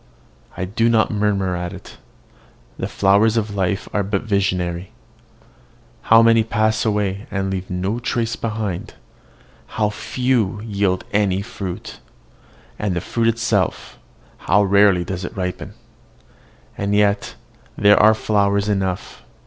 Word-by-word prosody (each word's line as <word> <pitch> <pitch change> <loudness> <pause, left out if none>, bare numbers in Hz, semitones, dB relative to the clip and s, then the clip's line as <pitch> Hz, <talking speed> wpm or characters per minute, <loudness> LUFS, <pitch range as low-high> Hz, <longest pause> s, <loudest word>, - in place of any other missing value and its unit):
I 95 - -2
do 115 +5 +1
not 110 -2 +2
murmur 100 -3 0
at 90 +1 -4
it: 90 - -12 0.8
the - - -4
flowers 100 +3 +3
of 105 -2 -1
life 95 0 -1
are 105 - +1
but 100 0 -2
visionary. 90 -4 -1 1.2
How 115 +1 +8
many 115 -1 +5
pass 110 -1 0
away, 105 0 -1
and 95 0 -2
leave 95 -1 -4
no 95 +6 -2
trace 115 -2 -1
behind 105 -6 -4 0.8
how 105 -1 +1
few 120 -3 -1
yield 100 -4 -1
any 100 -2 +1
fruit 95 -3 -7 0.8
and 100 -4 -1
the - - 0
fruit 115 +6 -1
itself, 115 -4 -1 0.5
how 105 +1 +5
rarely 100 -2 +4
does 90 +1 -5
it 85 - -7
ripen! 90 -1 -4 1.0
And 100 0 -1
yet 105 -1 +1 0.4
there 105 0 +5
are 110 +1 +6
flowers 100 -1 +1
enough! 95 -3 -2
100 Hz, 130 wpm, -20 LUFS, 95-110 Hz, 1.2 s, How